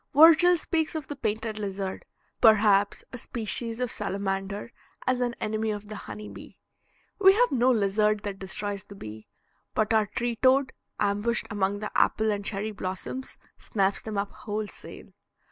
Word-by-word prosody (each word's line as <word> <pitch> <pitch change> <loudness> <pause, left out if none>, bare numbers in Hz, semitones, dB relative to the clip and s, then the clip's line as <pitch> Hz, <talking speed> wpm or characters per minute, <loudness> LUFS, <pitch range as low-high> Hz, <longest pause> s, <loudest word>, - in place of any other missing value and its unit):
Virgil 335 +3 +8
speaks 320 0 -1
of 310 -3 -3
the 290 - -4
painted 220 -3 -3
lizard, 195 -2 -4 0.4
perhaps 205 -2 +5
a 250 - -5
species 230 0 -1
of 250 -2 0
salamander, 200 +1 -3 0.3
as 255 -1 +1
an 240 -1 0
enemy 220 +1 -1
of 210 0 -4
the 215 - -6
honey 105 - -8
bee. 100 - -12 0.6
We 385 -1 +8
have 485 +4 +3
no 255 -1 +3
lizard 210 -1 +2
that 200 -2 -5
destroys 200 +1 -3
the 200 - -13
bee; 110 - -9 0.5
but 215 +1 +2
our 215 -1 +3
tree 240 +2 -2
toad, 260 +2 +3 0.3
ambushed 205 +3 0
among 205 0 -1
the 210 - -4
apple 220 0 +3
and 205 -1 -2
cherry 205 +2 -2
blossoms, 195 +6 -5 0.2
snaps 195 -1 0
them 215 -2 -5
up 200 0 -1
wholesale. 210 -1 -6
215 Hz, 160 wpm, -27 LUFS, 200-240 Hz, 0.6 s, Virgil